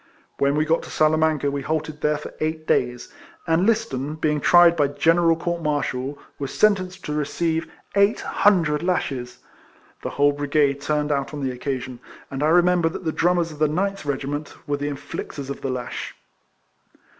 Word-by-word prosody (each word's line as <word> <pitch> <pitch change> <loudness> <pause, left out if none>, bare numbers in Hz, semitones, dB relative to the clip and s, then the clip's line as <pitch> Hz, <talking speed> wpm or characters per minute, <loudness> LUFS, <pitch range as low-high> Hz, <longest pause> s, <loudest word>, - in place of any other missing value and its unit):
AVhen 140 +1 +2
we 155 +1 +2
got 165 +1 +2
to - - -10
Sala 155 0 +3
manca 155 -3 +1
we 140 0 -3
halted 155 +1 -3
there 150 0 +2
for 150 - -9
eight 155 0 -2
days; 125 -4 0 0.3
and 165 +4 +2
I^iston, 155 - -1
being 150 -2 +1
tried 175 -1 +6
by 145 -3 +3
general 165 +3 +3
court 170 +1 -3
martial, 145 -3 -2 0.2
was 140 -2 -4
sentenced 190 -3 +1
to 150 - -3
receive 160 +2 -1 0.2
eight 200 +2 +3
hundred 165 -7 +2
lashes. 135 -8 -2 0.6
The - - -3
whole 145 0 +3
brigade 145 -1 +1
turned 150 0 0
out 140 +1 -1
on 145 - -5
the 130 - 0
occasion; 130 -1 -4 0.3
and 135 0 -4
I 150 - +3
remember 175 0 +4
that 170 - -7
the 160 - +1
drummers 170 0 +1
of 150 - -11
the 155 - +4
Ninth 195 +6 -1
regiment 145 +1 -3
Avere 145 0 -1
the 145 - -2
inflictors 140 0 -6
of - - -7
the 135 - -2
lash. 125 -1 -5
150 Hz, 180 wpm, -23 LUFS, 140-165 Hz, 0.6 s, tried